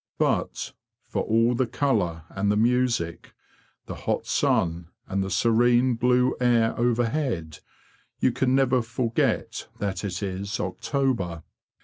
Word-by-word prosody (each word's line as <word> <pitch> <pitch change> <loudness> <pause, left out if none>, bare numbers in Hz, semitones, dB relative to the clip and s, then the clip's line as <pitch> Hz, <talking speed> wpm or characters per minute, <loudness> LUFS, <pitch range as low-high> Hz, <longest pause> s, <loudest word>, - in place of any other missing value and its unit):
But, - - -1 0.3
for - - -3
all 115 +2 +2
the 125 +1 0
colour 90 - 0
and 100 +1 0
the 105 - +1
music, 115 -7 0 0.5
the - - -6
hot - - -2
sun, 85 0 +1 0.2
and 95 0 -1
the 95 - -4
serene 120 +5 +3
blue 125 +2 +2
air 115 -2 +3
overhead, 120 - -1 0.6
you 130 - +2
can 130 +2 +1
never 130 -2 +3
forget 115 0 -1
that 95 -2 -3
it 95 0 -3
is 100 +1 -3
October. 115 - -2
115 Hz, 125 wpm, -25 LUFS, 95-125 Hz, 0.6 s, serene